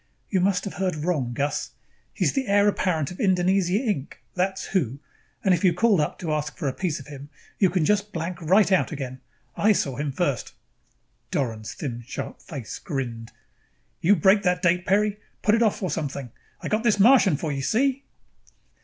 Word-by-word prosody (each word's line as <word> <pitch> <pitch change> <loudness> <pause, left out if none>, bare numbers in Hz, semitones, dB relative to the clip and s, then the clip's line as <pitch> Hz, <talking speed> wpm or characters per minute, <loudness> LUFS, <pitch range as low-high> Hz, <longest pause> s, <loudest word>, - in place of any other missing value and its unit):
"You 190 - +2
must 185 0 +2
have 200 - -5
heard 185 -3 -1
wrong, 150 -6 -1
Gus. 145 +3 -2 0.4
He's - - 0
the 270 -3 -1
heir 200 +1 +4
apparent 175 -7 0
of 180 - -10
Indonesia, 185 -1 +2
Inc., 205 - -1 0.2
that's 190 +1 -1
who, 140 - 0 0.5
and 190 - +4
if 175 - 0
you 180 -3 +4
called 215 -2 +3
up 150 - -2
to 160 -3 -3
ask 150 0 -3
for 145 - -2
a 135 - -1
piece 175 -2 -2
of 140 - -11
him, 145 -1 -10 0.3
you 190 - +5
can 175 -2 +1
just 210 +3 +1
blank 170 +1 -4
right 190 +5 +4
out 185 - +3
again. 130 -3 -6 0.3
I 215 +1 +4
saw 135 -9 -1
him 145 0 -2
first!" 140 -5 -2 0.7
Doran's 110 -5 -3
thin 120 -5 -5
sharp - - -6
face 140 - -7
grinned. 120 -7 -5 0.7
"You 195 +5 +4
break 190 +4 +4
that 180 -1 0
date, 180 +1 +2
Peri. 205 +2 +2 0.2
Put 210 - +4
it 230 - +3
off 220 -2 +1
or 180 - -1
something. 140 -5 -4 0.3
I - - -4
got 215 +1 +1
this 220 -4 +2
Martian 220 - +6
for 155 +1 -3
you, 135 -1 -3
see?" 270 - +1
180 Hz, 190 wpm, -25 LUFS, 145-200 Hz, 0.7 s, Martian